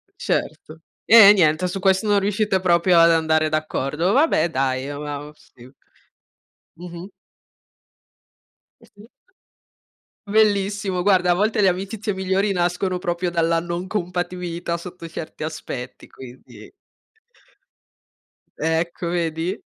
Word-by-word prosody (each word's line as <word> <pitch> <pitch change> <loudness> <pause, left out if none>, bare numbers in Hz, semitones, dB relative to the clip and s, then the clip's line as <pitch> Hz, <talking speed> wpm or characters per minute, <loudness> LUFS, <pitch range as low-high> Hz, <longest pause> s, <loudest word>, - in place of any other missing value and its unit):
Certo. 155 +1 -4 0.3
Eh, 210 -2 +9
niente. 170 -1 +2
Su 190 +2 -5
questo 190 +2 +1
non 205 -1 +3
riuscite 205 -1 0
proprio 175 0 +3
ad 165 0 +6
andare 160 -1 +2
d'accordo. 155 +2 -1
Vabbè 255 - +2
dai, 130 -2 -1
e 145 - -5
uhm, 145 +1 -7 0.2
uhm 150 - -11
sì. 120 -4 -19 1.1
Mh 175 +2 -12
mh. 175 +3 -8 1.7
Eh - - -18
sì. 210 +3 -17 1.2
Bellissimo 205 -2 +1
guarda, 185 -2 +3
a - - +4
volte 210 +2 0
le 190 - +5
amicizie 200 +3 -3
migliori 190 +2 -1
nascono 180 +1 -1
proprio 175 0 -2
dalla 165 -1 +1
non 175 +2 -5
compatibilità 175 -3 -4
sotto 170 -1 -10
certi 160 -1 -8
aspetti, 135 -5 -7
quindi. 130 -1 -14 1.9
Ecco, 165 +2 -2
vedi? 170 +2 -2
175 Hz, 120 wpm, -21 LUFS, 160-195 Hz, 1.9 s, Eh